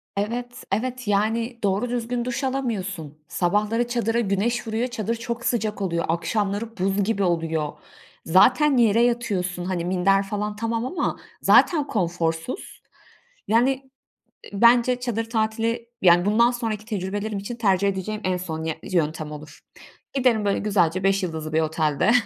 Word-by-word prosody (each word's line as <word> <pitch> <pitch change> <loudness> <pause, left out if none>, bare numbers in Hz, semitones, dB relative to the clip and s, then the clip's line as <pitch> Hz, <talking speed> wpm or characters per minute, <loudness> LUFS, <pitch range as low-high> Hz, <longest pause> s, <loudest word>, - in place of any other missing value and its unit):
Evet, 240 +4 -3
evet 250 +3 -2
yani 225 +4 0
doğru 200 +5 +1
düzgün 240 0 -2
duş 250 +2 -3
alamıyorsun. 200 - -3
Sabahları 210 +8 0
çadıra 235 -1 0
güneş 225 +2 0
vuruyor. 225 +3 -1
Çadır 230 -2 -2
çok 235 +1 -5
sıcak 215 -3 -1
oluyor. 170 -3 -1
Akşamları 205 +6 -1
buz 195 +2 +1
gibi 200 -1 0
oluyor. 165 -4 0 0.5
Zaten 255 - +5
yere 230 -1 +4
yatıyorsun. 190 -7 -1
Hani 180 -2 -2
minder 190 +2 +2
falan 210 +1 -3
tamam 230 +2 -2
ama 350 +8 -2 0.2
zaten 300 -5 +5
konforsuz. 170 - -2 0.7
Yani, 235 +5 +4 0.8
ııı, 200 - -4
bence 245 +1 +5
çadır 225 -2 -3
tatili 230 +1 -1
yani 175 -1 +5
bundan 230 +4 +4
sonraki 225 -3 -3
tecrübelerim 205 0 -3
için 200 +5 -5
tercih 200 -4 +2
edeceğim 200 +2 -3
en 185 -1 0
son 160 -3 -5
yö 160 0 -1
yöntem 155 -4 -1
olur. 150 0 -10 0.5
Giderim 245 -6 +2
böyle 200 - +1
güzelce 185 -3 +1
5 195 0 +2
yıldızlı 160 -3 -4
bir 160 - +3
otelde 155 +3 +1
210 Hz, 145 wpm, -24 LUFS, 185-235 Hz, 0.8 s, Zaten